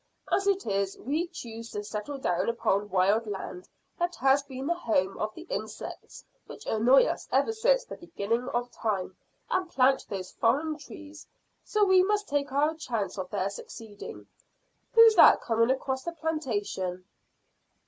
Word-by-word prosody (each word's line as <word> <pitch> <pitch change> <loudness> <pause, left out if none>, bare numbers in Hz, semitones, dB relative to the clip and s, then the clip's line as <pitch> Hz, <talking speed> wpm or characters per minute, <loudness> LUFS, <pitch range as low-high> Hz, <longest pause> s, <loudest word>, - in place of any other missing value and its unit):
As 395 - +2
it 395 -1 +1
is, 195 -2 -1
we 305 +8 -2
choose 230 -6 -8
to 205 - -3
settle 210 +7 -5
down 185 -6 0
upon 205 -3 0
wild 200 +4 +2
land 190 -2 -6 0.3
that 350 0 -1
has 270 +2 +3
been 270 -1 -7
the 340 - +2
home 215 - 0
of 215 - -1
the 330 - -9
insects 220 -10 -7 0.2
which - - -11
annoy 240 +5 +5
us - - -3
ever 450 - +2
since - - +2
the - - -8
beginning 235 -5 -2
of 245 0 -2
time, 195 -4 -2 0.4
and 370 -1 0
plant 265 -3 +2
those 190 -2 -5
foreign 290 +7 +1
trees, 300 +1 -11 0.4
so 425 -1 +2
we 375 -1 +6
must 415 +2 +1
take 285 -1 -1
our 295 +3 +2
chance 220 - -3
of 185 -1 -4
their 195 -1 -1
succeeding. 205 0 -9 0.7
Who's 455 -1 +9
that - - +8
coming 230 0 +1
across 265 0 -1
the 340 - -4
plantation?" 210 - -3
245 Hz, 160 wpm, -28 LUFS, 205-320 Hz, 0.7 s, Who's